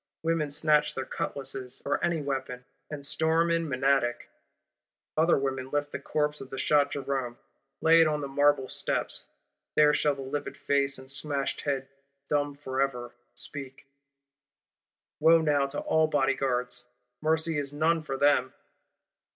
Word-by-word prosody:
Women 165 -2 0
snatch 150 0 +2
their 130 - -3
cutlasses, 135 -2 -3
or 145 - -1
any 165 -3 0
weapon, 130 -3 -4 0.2
and 145 -2 -4
storm 160 +3 +2
in 165 -1 0
Menadic:—other 135 +4 -1
women 135 -1 -2
lift 145 0 -1
the - - -4
corpse 150 -1 -1
of 135 - -10
shot 145 0 +3
Jerôme; 135 -3 -3 0.4
lay 165 +1 +6
it - - +6
down 155 -1 +1
on 150 - -4
the 140 - -3
Marble 145 -1 +2
steps; - - -2 0.5
there 150 -1 +6
shall 145 -1 +2
the 135 - -7
livid 140 +2 -4
face 140 -1 +1
and 130 +1 -9
smashed 140 0 -2
head, 135 -2 -2 0.4
dumb 145 -1 0
for 135 -2 -3
ever, 125 -3 -2 0.2
speak. 135 -2 -6 1.3
Wo 165 +2 +6
now 145 -3 +2
to 140 - -4
all 160 0 +2
Bodyguards, 135 -4 0 0.4
mercy 160 0 +1
is 140 -1 -3
none 160 +3 +1
for 135 -3 -4
them! 140 -2 +3
145 Hz, 145 wpm, -28 LUFS, 135-150 Hz, 1.3 s, lay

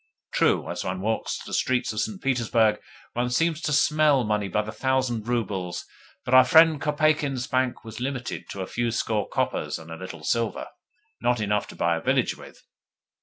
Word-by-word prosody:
True, - - +2
as - - -4
one 90 0 -3
walks 110 +2 -1
the - - -9
streets 130 -3 +1
of 105 - -3
St. 200 - -2
Petersburg 115 - +2 0.3
one 120 +1 0
seems 165 +5 +1
to 155 - -1
smell 150 -2 +4
money 105 -2 0
by 105 +3 0
the 110 - -6
thousand 120 -1 -1
roubles, 100 -7 -2 0.4
but 125 - -2
our 130 0 +9
friend 160 +2 +5
Kopeikin's 150 -3 +1
bank 130 -1 -1
was 110 +1 -8
limited 125 -1 -4
to 100 - -5
a - - -2
few 120 +4 -2
score 110 -2 -1
coppers 75 0 -1
and 80 0 -12
a - - -5
little 90 -3 -8
silver 115 +7 -1 0.5
not 120 0 +2
enough 105 -1 0
to - - -11
buy 85 -1 +1
a - - -6
village - - +1
with! - - -14
120 Hz, 185 wpm, -25 LUFS, 105-135 Hz, 0.5 s, our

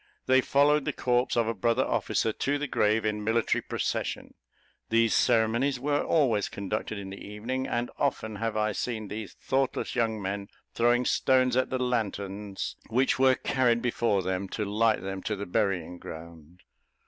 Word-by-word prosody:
They 130 0 +5
followed 145 +2 +3
the - - -1
corpse 125 0 +1
of 115 -2 +2
a 115 - 0
brother 115 +4 +1
officer 110 - 0
to 140 +6 0
the 150 - -2
grave 110 -4 +1
in 105 -1 -1
military 110 +2 +1
procession. - - -3 0.6
These 115 0 +3
ceremonies 120 +3 +2
were 145 +2 0
always 120 -10 +2
conducted 105 +2 -4
in 95 -1 -7
the 100 - -9
evening, 120 +6 -4
and 120 +1 -2
often 110 -6 -1
have 115 0 -2
I 110 0 +1
seen 110 -1 -3
these 105 -3 -6
thoughtless 135 0 -1
young 115 -3 0
men 100 0 -4 0.3
throwing 120 +1 +3
stones 130 -1 +3
at 130 0 +2
the 130 - -1
lanthorns 105 -5 -3
which 130 +3 +2
were 130 -1 +5
carried 125 -4 +1
before 115 -5 +1
them 95 +1 -2
to 105 - -1
light 110 +2 +1
them 95 0 -4
to 105 - -2
the 100 +1 -5
burying 90 -2 -1
ground. 85 +1 -11
115 Hz, 170 wpm, -28 LUFS, 100-125 Hz, 0.6 s, They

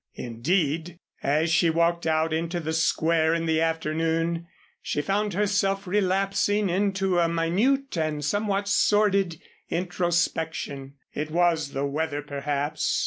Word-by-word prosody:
Indeed, 155 +7 -1 0.2
as 155 +4 +1
she 170 0 +4
walked 170 +1 +1
out 160 0 +1
into 170 +2 -1
the 160 -1 -3
Square 160 0 +2
in 165 0 -1
the 160 0 +1
afternoon 165 +1 -1 0.3
she - - -2
found 200 +5 -1
herself 195 -1 +1
relapsing 195 +1 +1
into 195 -1 +1
a 170 -1 +3
minute 205 +12 +1
and 150 -2 -1
somewhat 205 +1 0
sordid 200 -5 +2 0.3
introspection. 165 -5 -2 0.2
It 150 +1 -3
was 165 -3 +1
the 135 +1 -1
weather, 145 +1 -2
perhaps. 145 +1 -1
165 Hz, 125 wpm, -25 LUFS, 155-195 Hz, 0.3 s, she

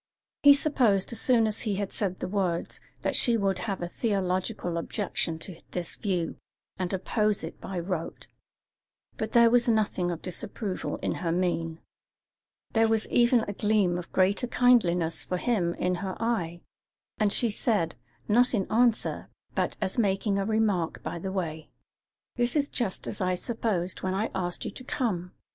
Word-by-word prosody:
He 285 -1 +9
supposed, 245 -10 +2
as 230 - 0
soon 240 -3 +4
as 215 -1 0
he 210 -3 0
had 200 0 -3
said 185 -3 -1
the - - -1
words, 185 -3 -1 0.2
that - - +1
she 235 -2 +3
would 195 -3 0
have 185 0 -3
a - - -2
theological 185 -3 -1
objection 170 -3 -2
to 165 +1 -8
this 175 -2 -2
view, 180 -6 -2 0.4
and 180 -1 -1
oppose 210 +2 0
it 160 - -7
by 190 -2 -4
rote; 170 -1 -4 0.9
but 220 - -3
there 235 -1 +6
was 245 0 +4
nothing 210 -5 +1
of 170 -1 -4
disapproval 185 +2 -3
in - - 0
her 170 -3 0
mien; 165 -2 -1 0.9
there 225 0 +4
was 220 -1 +1
even 240 0 +4
a 205 - -4
gleam 205 -4 +2
of 175 - -9
greater 195 +6 +2
kindliness 180 -11 +3
for 180 - -2
him 180 -6 0
in 180 0 0
her 190 -2 -4
eye, 175 -8 -1 0.6
and 210 -2 +3
she 235 +2 +1
said, 205 -5 0 0.3
not 245 +3 +4
in 195 -3 0
answer, 235 0 +2 0.2
but - - -1
as 195 +3 -1
making 200 -1 +1
a 195 - 0
remark 210 -6 0
by 170 - -4
the 190 +3 -4
way: 160 -5 -4 0.7
"That 240 +2 +1
is 290 -1 +2
just 220 -7 -2
as - - -4
I 185 0 +1
supposed 190 -4 -2
when 185 0 -1
I 210 +3 -1
asked 175 -2 -2
you - - -3
to 255 - -9
come. 190 -10 -2
195 Hz, 170 wpm, -28 LUFS, 180-225 Hz, 0.9 s, He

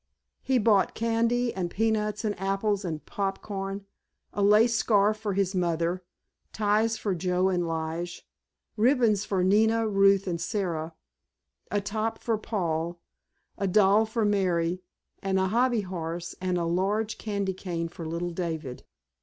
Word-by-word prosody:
He 260 -1 +1
bought 210 -4 +3
candy 230 +1 +1
and 180 -2 -2
peanuts 215 +1 0
and 210 - +1
apples 195 +1 0
and 155 -5 -4
popcorn, 195 0 -4 0.5
a 205 - -2
lace 210 +4 +5
scarf 215 -2 +3
for 210 -2 -3
his 195 -1 +1
mother, 175 0 0 0.5
ties 215 +1 +1
for 205 -3 -1
Joe 180 +1 +1
and 175 -2 0
Lige, 165 +2 -4 0.5
ribbons 225 -3 +3
for 190 -3 0
Nina, 220 +4 +3
Ruth 195 -1 +4
and 170 -3 -2
Sara, 170 -4 -2 0.7
a 205 - 0
top 215 +3 -2
for 225 -3 -1
Paul, 170 -5 -2 0.6
a 195 - 0
doll 205 +3 +4
for 220 0 0
Mary, 180 -3 +1 0.4
and 190 0 0
a 190 0 +1
hobby 240 +1 +2
horse 175 -2 -5
and 185 -1 0
a 170 - 0
large 200 +6 0
candy 200 -3 -2
cane 175 -3 -4
for 170 +1 -9
little 170 +2 -3
David. 160 -7 -4
195 Hz, 145 wpm, -27 LUFS, 175-215 Hz, 0.7 s, lace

